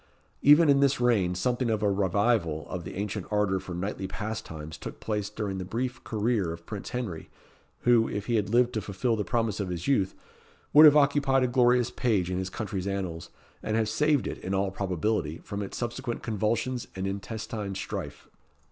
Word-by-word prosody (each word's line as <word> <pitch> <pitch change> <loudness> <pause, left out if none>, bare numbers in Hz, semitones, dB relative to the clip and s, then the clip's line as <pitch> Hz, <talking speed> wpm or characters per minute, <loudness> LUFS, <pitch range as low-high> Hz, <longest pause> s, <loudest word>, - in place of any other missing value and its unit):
Even 150 +3 +7
in 140 -1 +5
this 140 -1 +3
reign 105 -8 +2
something 120 +6 0
of 110 -1 0
a 100 - +3
revival 95 -4 +1
of 90 -1 -4
the - - -7
ancient 105 0 -3
ardour 105 -2 +1
for 90 -1 -7
knightly 95 +1 -3
pastimes 85 -7 -6
took - - -8
place 105 -2 -2
during 100 -3 -4
the - - -3
brief 125 +6 -3
career 110 -5 0
of 85 0 -9
Prince 105 +1 -6
Henry, 110 -10 -4 0.5
who, 120 -2 +4
if 100 0 -4
he 120 - -1
had 105 -3 +1
lived 120 +2 +3
to 110 - -1
fulfil 115 +5 -1
the 105 - -1
promise 110 +1 -1
of 100 -3 -2
his 85 +3 -4
youth, 100 -9 +2 0.6
would 155 +1 +10
have 150 0 +7
occupied 140 -2 +3
a - - +3
glorious 125 -1 +3
page 100 -7 0
in 90 - -1
his 95 0 -3
country's 95 -1 -4
annals, 90 -4 -3 0.3
and 110 - -2
have 110 -1 +1
saved 150 +5 +2
it, - - -4
in 95 +1 -3
all 95 0 0
probability, 95 -3 -1
from 100 0 -5
its 100 - -5
subsequent 120 0 -4
convulsions 115 +3 -1
and 95 0 -3
intestine 100 0 -4
strife. 95 - -6
105 Hz, 190 wpm, -28 LUFS, 95-120 Hz, 0.6 s, would